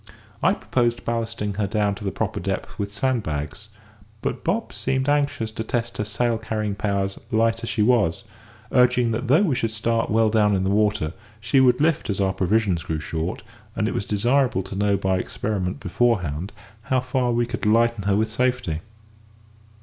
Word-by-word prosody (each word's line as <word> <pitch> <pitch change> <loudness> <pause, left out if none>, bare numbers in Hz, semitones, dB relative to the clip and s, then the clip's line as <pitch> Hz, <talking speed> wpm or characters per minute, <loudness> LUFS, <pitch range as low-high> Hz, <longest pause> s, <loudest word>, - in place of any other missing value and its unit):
I - - +3
proposed 120 -1 0
ballasting 115 -3 -2
her 100 - +1
down 105 -1 +1
to 100 +1 -8
her - - +1
proper - - -2
depth 95 +4 -4
with 100 0 -2
sand 130 +2 0
bags, 75 +6 -5 0.5
but - - -2
Bob - - -1
seemed 130 +1 -1
anxious 145 -6 +1
to 110 - -4
test 115 +1 -3
her - - +1
sail 115 +2 0
carrying 110 -2 -2
powers 100 -1 -1
light 115 -1 +2
as 115 - -3
she 110 -1 +1
was, 115 -4 +2 0.5
urging 125 -2 +4
that 115 +3 -2
though 150 +10 +5
we 165 -9 +2
should 120 -3 0
start 115 +1 0
well 110 0 +3
down 105 -2 +3
in 95 - 0
the 95 - +1
water, 105 -6 +1 0.3
she 115 +5 +2
would 125 -1 +5
lift 155 -4 +1
as 100 - -1
our 95 -1 +2
provisions 95 -2 +1
grew 80 -1 -3
short; 80 +3 -4 0.3
and - - 0
it - - -1
was 100 - -2
desirable 120 +1 +2
to 95 - -8
know 100 0 +2
by 95 -1 0
experiment 95 -2 -3
beforehand 90 -5 0 0.4
how 130 - +3
far 125 0 0
we 120 0 +1
could 120 -2 -3
lighten 115 -1 +3
her 100 -1 +3
with 110 +1 +1
safety. 125 -9 0
110 Hz, 190 wpm, -23 LUFS, 100-120 Hz, 0.5 s, though